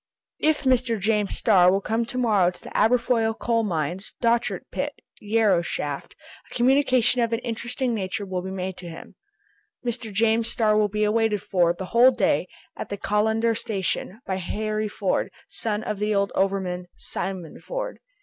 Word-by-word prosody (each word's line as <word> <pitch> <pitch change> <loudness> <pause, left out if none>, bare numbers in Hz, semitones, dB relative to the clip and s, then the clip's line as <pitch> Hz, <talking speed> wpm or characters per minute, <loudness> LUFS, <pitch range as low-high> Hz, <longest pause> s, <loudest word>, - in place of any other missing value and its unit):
If 310 -1 +2
Mr. 250 -4 +2
James 210 0 0
Starr 185 -5 +5
will 195 - +2
come 225 +3 -1
to 250 - -4
morrow 210 -8 +3
to 180 - -11
the - - -10
Aberfoyle 230 -1 +2
coal 230 -1 +1
mines, 175 -1 -3
Dochart 235 0 +1
pit, - - -2 0.3
Yarrow 210 -4 +2
shaft, 145 -4 -4 0.3
a - - -11
communication 255 -1 +3
of 230 0 0
an 230 - +1
interesting 240 +2 -2
nature 200 -1 -3
will 185 -2 -3
be 190 - -6
made 190 -1 -4
to 175 -2 -8
him. 165 - -10 0.7
"Mr. 235 -2 -2
James 225 +2 +2
Starr 215 -2 +2
will 210 -1 +3
be 210 +1 -1
awaited 210 -1 +1
for, 175 -3 +2
the 180 +2 -5
whole 240 +2 +8
day, 260 - +1 0.3
at - - -6
the 200 - -4
Callander 220 +3 +1
station, 200 -1 -2
by 190 - -2
Harry 215 +3 -2
Ford, 200 -2 -1 0.2
son 215 -1 -2
of 210 -2 -3
the 210 0 0
old 200 0 +1
overman 190 -2 -1
Simon 185 -5 -4
Ford." - - -5
215 Hz, 170 wpm, -24 LUFS, 190-230 Hz, 0.7 s, whole